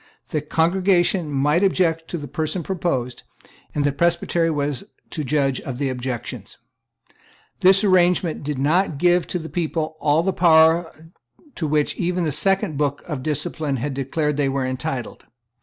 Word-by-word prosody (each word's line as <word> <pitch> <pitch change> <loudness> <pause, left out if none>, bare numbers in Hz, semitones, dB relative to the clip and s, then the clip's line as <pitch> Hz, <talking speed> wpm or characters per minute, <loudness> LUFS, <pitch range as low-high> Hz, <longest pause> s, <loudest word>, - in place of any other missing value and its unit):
The 155 - -1
congregation 175 +1 +1
might 150 +6 +2
object 165 -4 +1
to 175 - -4
the 145 -2 -7
person 160 +5 -3
proposed; 135 -10 -2 0.5
and 145 - +1
the 145 - +2
Presbytery 170 +2 +1
was 145 -4 -2 0.3
to 155 - -3
judge 135 -1 0
of 130 -2 -6
the 140 0 -1
objections. 125 -1 -5 1.0
This 190 +2 +5
arrangement 180 -3 +2
did 145 -1 -3
not 155 +4 +1
give 175 +2 +2
to - - -2
the 160 -2 -6
people 160 0 -3
all 150 +2 +2
the 190 +1 0
power 165 -1 +4 0.6
to 160 - -3
which 150 0 0
even 180 0 -1
the 155 - 0
Second 190 0 +1
Book 145 -1 -1
of 150 -6 -4
Discipline 150 0 -2
had 140 +4 -3
declared 145 +2 -1
that - - +1
they 135 - +1
were 135 -1 -1
entitled. 130 -1 -5
155 Hz, 160 wpm, -22 LUFS, 140-175 Hz, 1.0 s, This